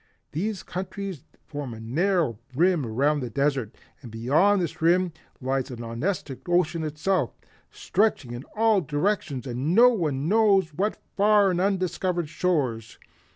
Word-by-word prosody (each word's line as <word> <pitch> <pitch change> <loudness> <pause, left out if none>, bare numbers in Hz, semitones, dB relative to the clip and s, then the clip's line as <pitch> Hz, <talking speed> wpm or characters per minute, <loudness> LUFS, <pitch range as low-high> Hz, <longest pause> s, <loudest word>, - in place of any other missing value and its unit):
These 195 +5 -3
countries 190 -3 -6 0.2
form 145 -5 -6
a - - -10
narrow 150 - 0 0.2
rim 170 -3 +2
around 140 +7 +1
the 125 -3 -4
desert, 135 -2 -1 0.3
and 125 - -10
beyond 145 - +3
this 170 -3 -3
rim 175 +1 +3 0.3
lies 130 0 -1
the 130 - -8
Nonestic 130 - -4
Ocean 175 -2 +1
itself, 155 0 -1 0.3
stretching 195 - 0
in 120 +2 -6
all 220 -2 +3
directions 145 -3 -1
and 120 -2 -4
to - - -3
no 195 - +6
one 155 - -1
knows 195 -5 +3
what 200 +7 -1 0.2
far 205 -1 +4
and 180 0 0
undiscovered 185 -3 0
shores. 135 -11 -1
165 Hz, 145 wpm, -25 LUFS, 135-190 Hz, 0.3 s, no